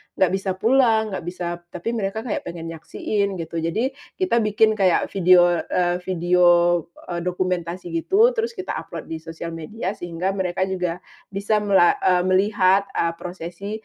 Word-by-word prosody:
enggak 190 -2 +3
bisa 195 0 -1
pulang, 225 0 +3
enggak 190 - -4
bisa 180 0 -4 0.2
tapi 180 +6 -4
mereka 220 -1 -3
kayak 230 - -4
pengen 165 -1 -6
nyaksiin 200 +5 -2
gitu. 165 -1 -4
Jadi 190 +11 -1 0.2
kita 365 -11 +1
bikin 215 0 +3
kayak 190 -5 +2
video, 175 -2 +5
eee, 175 0 +1
video, 180 0 +2 0.7
eee, 170 - -2
dokumentasi 180 -1 -3
gitu 400 - +3
terus 460 0 -2
kita 370 - -4
upload - - -8
di 160 - -4
sosial 165 +1 -7
media 180 +5 -4
sehingga 175 +1 -3
mereka 185 -1 -1
juga 180 -3 -2 0.3
bisa 200 +2 0
mela 195 -4 +4
eee, 180 -1 +3
melihat, 195 0 +3
eee, 170 - +1
prosesi 180 +2 -7
185 Hz, 155 wpm, -22 LUFS, 175-210 Hz, 0.7 s, video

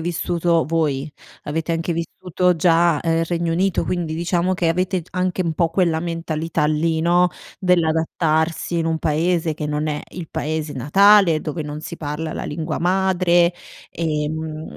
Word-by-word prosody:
vissuto 170 0 0
voi 150 -3 -1 0.3
avete 160 +3 -2
anche 165 +1 -1
vissuto 180 +2 -1
già, 170 -1 +3
ehm, 165 0 +1
Regno 170 0 -1
Unito, 185 +2 +1
quindi 170 -3 -2
diciamo 175 +2 0
che 175 -2 0
avete 185 +2 0
g - - -22
anche 185 0 -1
un 165 -2 -1
po' 170 0 +2
quella 165 -2 +1
mentalità 165 -2 -2
lì, 160 +2 +1
no, 175 +2 +3 0.3
dell'adattarsi 165 -1 +1
in 165 - 0
un 160 -1 0
paese 160 +1 0
che 150 0 -4
non 150 +1 -2
è 150 -1 -2
il 175 -3 -8
paese 155 0 -3
natale, 175 - +5
dove 155 +1 -4
non 150 0 -6
si 170 - -7
parla 155 +1 -4
la - - -5
lingua 155 +1 -3
madre, 180 -1 +2 0.4
ehm, 150 -2 -2
mhmm, 155 0 -6
165 Hz, 165 wpm, -21 LUFS, 155-175 Hz, 0.4 s, natale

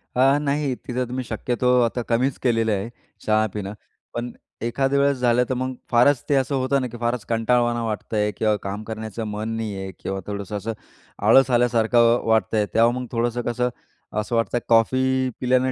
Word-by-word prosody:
अ, 135 +3 +4
नाही, 145 -2 0
तिथं 125 +1 -3
तुम्ही 130 +2 -3
शक्यतो 125 +2 +1
आता 120 +1 0
कमीच 125 +3 +1
केलेलं 115 -3 +2
आहे 100 +2 -2 0.4
चहा 110 0 +3
पिणं, 100 -1 -4 0.4
पण 120 +1 -4 0.3
एखाद्या 135 +4 +1
वेळेस 140 -1 +2
झालं 125 -1 +3
तर - - +1
मग 130 +1 -2 0.2
फारच 125 +2 +4
ते 145 - +3
असं 135 +1 +1
होतं 135 +1 +1
ना, 130 - -2
की 120 0 -9
फारच 120 -1 -2
कंटाळवाणा 120 +1 +1
वाटत 110 0 -4
आहे 105 -1 +1
किंवा 110 -1 +2
काम 100 +2 -4
करण्याचं 110 0 -5
मन 105 +1 -4
नाही 110 -3 -3
आहे 95 0 -5
किंवा 95 0 -4
थोडंसं 100 0 -4
असं 115 +3 -4 0.5
आळस 135 +5 +6
आल्यासारखं 120 0 +3
वाटतंय. 110 -1 +2
तेव्हा 115 +1 +5
मग 125 - -4
थोडंसं 120 +1 -1
कसं 125 +1 -1 0.5
असं 105 +3 -2
वाटतंय, 115 +1 +1
कॉफी 130 +3 +3
पिल्यानं 130 +1 +2
120 Hz, 180 wpm, -23 LUFS, 110-130 Hz, 0.5 s, आळस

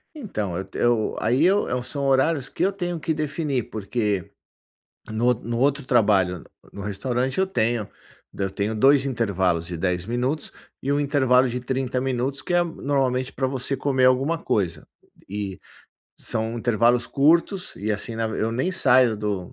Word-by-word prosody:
Então, 105 - -4
eu 95 - -5
eu 120 -2 +1
aí 130 +8 +2
eu 185 -10 +2
são 140 +2 -4
horários 135 +1 +2
que - - -2
eu 195 - +2
tenho 175 -3 -3
que 160 - -1
definir, 150 -4 -2
porque 105 -2 -2 0.8
no 120 +3 +2
o - - +3
no 115 +1 -4
outro 140 +1 +1
trabalho, 100 -7 +3
n - - -14 0.3
no 100 - -7
restaurante, 125 - -2
eu 190 - +3
tenho 115 - 0 0.5
eu 95 -1 -1
tenho 100 +3 -2
2 135 +4 +5
intervalos 95 -9 0
de 90 - -5
10 90 0 -1
minutos, 125 +6 -2 0.3
e 140 - -2
1 145 - +2
intervalo 130 -3 +3
de 125 +1 -3
30 130 0 -2
minutos, 135 +1 -1
que - - -4
é 175 - +5
normalmente 135 -5 -1
pra 130 - -1
você 130 +1 -2
comer 130 -1 +1
alguma 135 +6 +2
coisa. 85 - -1 0.4
E 100 -2 -4 0.6
são 110 +1 -2
intervalos 120 +1 +2
curtos 170 +6 +2
e, 105 +3 -3
assim, 110 +2 -4
na 115 0 0
eu 110 0 -1
nem 130 +10 0
saio 125 -7 +4
do 100 -4 -3
125 Hz, 170 wpm, -24 LUFS, 105-140 Hz, 0.8 s, 2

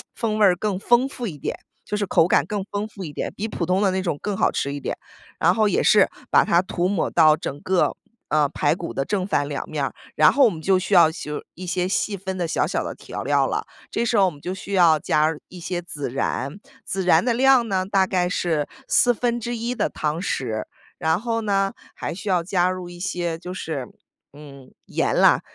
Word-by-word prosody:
风 215 -2 -1
味 210 - +6
儿 185 -2 +5
更 190 0 -2
丰 240 +5 +3
富 250 -3 -5
一 160 -7 -6
点， - - -4 0.3
就 - - -3
是 205 -1 -1
口 165 - +4
感 - - +3
更 205 -2 -2
丰 205 +1 -2
富 200 -3 -9
一 150 -4 -7
点， - - -3
比 215 - -3
普 185 -5 -3
通 185 +2 +2
的 195 - +3
那 190 0 -1
种 170 -6 -2
更 205 -1 -3
好 - - +2
吃 140 - -2
一 145 - -4
点， - - -4 0.4
然 - - +3
后 215 -2 +2
也 - - +1
是 205 -2 +6 0.2
把 - - +6
它 170 - +3
涂 180 -1 -1
抹 195 -3 0
到 155 -2 +5
整 140 -1 -5
个， 185 -1 +1 0.3
呃， 150 -2 +3
排 145 0 +1
骨 170 -1 -6
的 135 - -2
正 190 +1 -1
反 145 -7 0
2 145 -1 -5
面 150 -3 -1
儿。 - - -5 0.2
然 155 - +6
后 280 - +4
我 - - +5
们 170 -6 -6
就 190 +3 +3
需 190 +2 -3
要 165 -3 +7
修 150 -2 -6
一 185 - -8
些 180 0 -1
细 200 +1 -1
分 190 0 -5
的 175 -2 -1
小 - - +1
小 - - -1
的 - - -5
调 - - -7
料 - - +2
了。 - - -2 0.3
这 - - 0
时 230 -1 +1
候 195 - +6
我 185 - +1
们 145 -2 -15
就 180 - -4
需 195 +1 -7
要 170 -4 +5
加 155 -1 +2 0.2
一 180 - -11
些 175 +1 -3
孜 150 -6 -5
然， 135 0 -2 0.4
孜 190 0 -1
然 175 -2 +4
的 240 0 +1
量 260 -1 +4
呢 190 -3 0
大 195 -1 +2
概 180 -2 +1
是 165 -5 -1 0.2
1/4 240 0 +1
的 - - +1
汤 150 +1 -2
匙。 115 - -2 0.3
然 160 +2 +1
后 230 -1 -1
呢， 195 -2 +1 0.2
还 - - -5
需 200 - -9
要 180 -3 +2
加 180 0 +1
入 185 -1 -6
一 175 0 -11
些 175 -2 -2
就 180 +2 -7
是， 155 -8 -4 0.5
嗯， 140 -3 -13
盐 - - 0
啦， - - +5
185 Hz, 245 characters per minute, -23 LUFS, 160-205 Hz, 0.5 s, 要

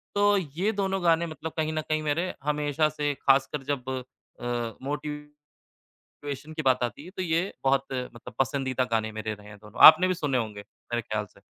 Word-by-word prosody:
तो 205 0 +4
ये 180 +5 -1
दोनों 195 -2 -1
गाने 170 0 +4
मतलब 160 0 -6
कहीं 155 0 0
न 155 - -1
कहीं 155 0 -1
मेरे 165 +5 0
हमेशा 150 +1 +1
से 145 -1 -1
ख़ासकर 135 +1 +2
जब 130 -2 -3 0.5
अ, - - -11 0.4
मोटिवेशन 150 0 -6 1.0
की 155 - -3
बात 125 -1 +3
आती 120 +5 -3
है 180 - -10
तो 185 - -2
ये 165 0 +1 0.2
बहुत 135 0 +3
मतलब 125 -2 -6
पसंदीदा 130 -1 0
गाने 110 -1 0
मेरे 110 0 -4
रहे 105 0 -15
हैं 105 0 -12
दोनों, 105 +2 -12
आपने 185 +4 +9
भी 185 - +1
सुने 145 -7 0
होंगे, 105 -3 -4
मेरे 120 +3 -6
ख्याल 105 -1 -3
से। - - -21
145 Hz, 185 wpm, -27 LUFS, 125-160 Hz, 1.0 s, आपने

